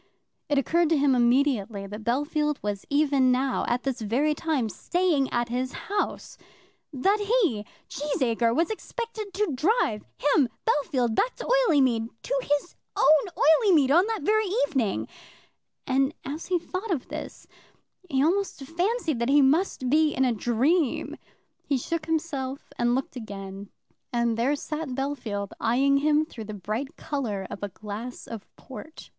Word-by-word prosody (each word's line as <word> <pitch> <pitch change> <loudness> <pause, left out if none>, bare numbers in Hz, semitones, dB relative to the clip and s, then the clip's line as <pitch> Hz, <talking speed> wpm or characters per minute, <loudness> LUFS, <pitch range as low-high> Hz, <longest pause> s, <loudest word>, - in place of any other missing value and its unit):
It 290 - +2
occurred 330 +5 +2
to 325 - +3
him 280 -1 +3
immediately 240 -5 +2
that 210 +2 -8
Bellfield 295 +5 0
was 205 -1 -3
even 280 -3 +3
now, 260 +1 +1
at 240 +1 0
this 265 -3 -2
very 255 +8 +1
time, 300 -6 -1
staying 315 - 0
at 240 0 0
his 255 +2 -2
house, 405 0 -3 0.5
that 385 +10 +2
he, 405 - +1 0.2
Cheesacre, 250 -5 0
was 335 +7 +1
expected 440 -1 -5
to 415 -3 0
drive 270 - +1
him, 290 -3 +3 0.2
Bellfield, 260 -6 +1
back 480 - +1
to - - -7
Oileymead, 280 - +3
to - - 0
his 290 -4 -1 0.2
own - - +2 0.3
Oileymead, 315 - +5
on 360 +4 +5
this 450 -4 -2
very 435 +4 +2 0.2
evening; 245 - -1 0.8
and 270 +3 +1
as 290 +4 -5
he 365 - +2
thought 370 +5 -5
of 320 -9 -2
this - - -7 0.6
he 270 -3 +2
almost 370 -2 0
fancied 340 - -1
that 235 +2 0
he 285 0 +6
must 280 -1 +2
be 305 +3 +3
in 265 - +2
a 245 - +2
dream. 250 - +1 0.5
He 280 - +2
shook 320 +5 -3
himself, 285 -4 -3
and 240 0 +2
looked 265 0 -3
again, 200 -3 -7 0.4
and 235 -1 +1
there 250 +6 +1
sat 305 +2 -4
Bellfield, 245 -8 -3
eyeing 270 +5 +3
him 300 +2 +3
through 230 -8 -9
the 215 0 -6
bright 220 - -4
colour 235 -11 -3
of - - -7
a 205 - -3
glass 215 +5 -7
of 225 -3 -8
port. 295 +4 -11
275 Hz, 155 wpm, -26 LUFS, 240-325 Hz, 0.8 s, he